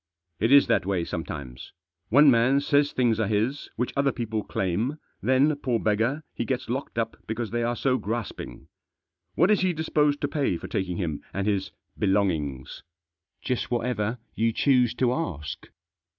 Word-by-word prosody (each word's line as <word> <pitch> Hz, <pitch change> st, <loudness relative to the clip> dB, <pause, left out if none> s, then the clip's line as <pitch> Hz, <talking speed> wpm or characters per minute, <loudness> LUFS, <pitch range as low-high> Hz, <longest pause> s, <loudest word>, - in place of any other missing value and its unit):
" -, -, -62 dB
It 115 Hz, +4 st, +2 dB
is 140 Hz, 0 st, +8 dB
that 115 Hz, -, +2 dB
way 90 Hz, -4 st, 0 dB
sometimes. 70 Hz, -8 st, -6 dB, 0.4 s
One 140 Hz, +4 st, +7 dB
man 125 Hz, +3 st, +4 dB
says 145 Hz, 0 st, +2 dB
things 120 Hz, -3 st, +1 dB
are 110 Hz, -, +1 dB
his 110 Hz, +7 st, -1 dB
which 125 Hz, +2 st, -2 dB
other 140 Hz, 0 st, +2 dB
people 110 Hz, -3 st, -3 dB
claim; 105 Hz, -, -1 dB, 0.2 s
then, 130 Hz, +7 st, +3 dB
poor 125 Hz, -5 st, 0 dB
beggar, 115 Hz, +9 st, 0 dB
he -, -, -2 dB
gets 130 Hz, 0 st, -3 dB
locked 135 Hz, -1 st, -4 dB
up 115 Hz, -1 st, -1 dB
because 110 Hz, 0 st, -3 dB
they 120 Hz, 0 st, -1 dB
are 120 Hz, +1 st, 0 dB
so 130 Hz, +1 st, +1 dB
grasping. 115 Hz, +1 st, -5 dB, 0.7 s
What 175 Hz, +6 st, +4 dB
is 210 Hz, -, +4 dB
he 185 Hz, -1 st, +2 dB
disposed 150 Hz, -2 st, +1 dB
to 145 Hz, -, +1 dB
pay 140 Hz, -, 0 dB
for -, -, -8 dB
taking 90 Hz, -3 st, -2 dB
him 80 Hz, -6 st, -3 dB
and 100 Hz, 0 st, -1 dB
his 100 Hz, -2 st, 0 dB, 0.3 s
belongings?" 85 Hz, -10 st, 0 dB, 0.3 s
" 85 Hz, 0 st, -58 dB
Just 125 Hz, -2 st, -1 dB
whatever 120 Hz, -2 st, -1 dB, 0.2 s
you 115 Hz, +1 st, +1 dB
choose 125 Hz, -1 st, +3 dB
to 125 Hz, -1 st, +2 dB
ask." 80 Hz, -, -4 dB
120 Hz, 175 wpm, -26 LUFS, 100-135 Hz, 0.7 s, is